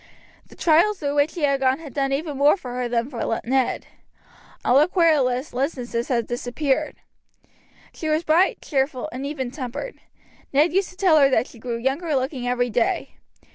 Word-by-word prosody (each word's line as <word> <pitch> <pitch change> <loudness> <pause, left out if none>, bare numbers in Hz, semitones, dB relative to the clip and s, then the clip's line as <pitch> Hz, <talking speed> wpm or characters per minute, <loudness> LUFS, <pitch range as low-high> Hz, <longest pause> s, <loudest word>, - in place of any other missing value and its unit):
The - - -16
trials 345 +6 +3
through 285 -4 -2
which 290 +2 +2
she 340 - -5
had 280 -1 +2
gone 260 0 +2
had 300 -6 -11
done 275 -1 0
even 295 +2 -2
more 285 +6 +4
for 250 -9 -8
her 250 -1 -2
than 235 0 0
for 230 -4 -2
Ned. 260 +1 0 0.8
All 255 +3 +5
her 300 - +4
querulous 305 -7 +2
listlessness 245 -3 -2
had 235 -3 0
disappeared. 265 +5 -2 1.0
She 315 - -4
was 310 +2 +1
bright, 335 +4 +2
cheerful, 270 0 -1
and 265 +3 -5
even 265 -4 -4
tempered. 280 - -6 0.5
Ned 300 +5 +3
used 385 0 +1
to 360 - -15
tell 360 -5 +4
her 275 -1 +5
that 245 -3 +2
she 235 - -15
grew 235 0 -4
younger 280 +6 -1
looking 260 -1 -2
every 245 -1 0
day. 230 +1 -1
275 Hz, 180 wpm, -23 LUFS, 250-310 Hz, 1.0 s, All